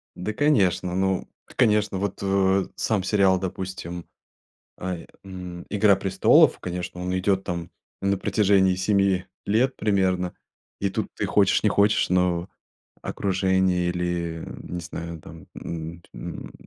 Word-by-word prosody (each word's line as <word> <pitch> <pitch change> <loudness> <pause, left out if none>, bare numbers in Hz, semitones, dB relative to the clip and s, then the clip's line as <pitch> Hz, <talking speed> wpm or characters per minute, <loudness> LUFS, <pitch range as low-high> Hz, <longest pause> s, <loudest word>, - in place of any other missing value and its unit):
Да, 105 +4 -4
конечно, 100 - +2
ну, 95 0 0 0.3
конечно, 105 -5 +2
вот 100 0 -3
в, 95 0 +2
э, - - -16
сам 105 -4 0
сериал, 95 -2 +3
допустим, 90 -2 -5 0.7
ай, 90 -2 -4 0.2
м, 90 -2 -8
"Игра 105 -1 +4
престолов", 95 -1 +4
конечно, 90 0 -5
он 90 +1 -1
идёт 95 +1 +1
там 85 -1 -4 0.3
на 100 0 +1
протяжении 95 -2 +3
7 95 -1 +2 0.2
лет 125 +6 +2
примерно, 95 -3 +1 0.5
и 100 - +1
тут - - -2
ты - - -2
хочешь 100 -2 +3
не 110 - +4
хочешь, 100 0 +3
но 90 -1 +1 0.5
окружение 95 -2 +1
или, 85 -2 -2 0.2
не 90 - -5
знаю, 85 0 -7
там, 80 +1 -12
м, 85 +1 -6
м, - - -7
95 Hz, 135 wpm, -25 LUFS, 90-100 Hz, 0.7 s, Игра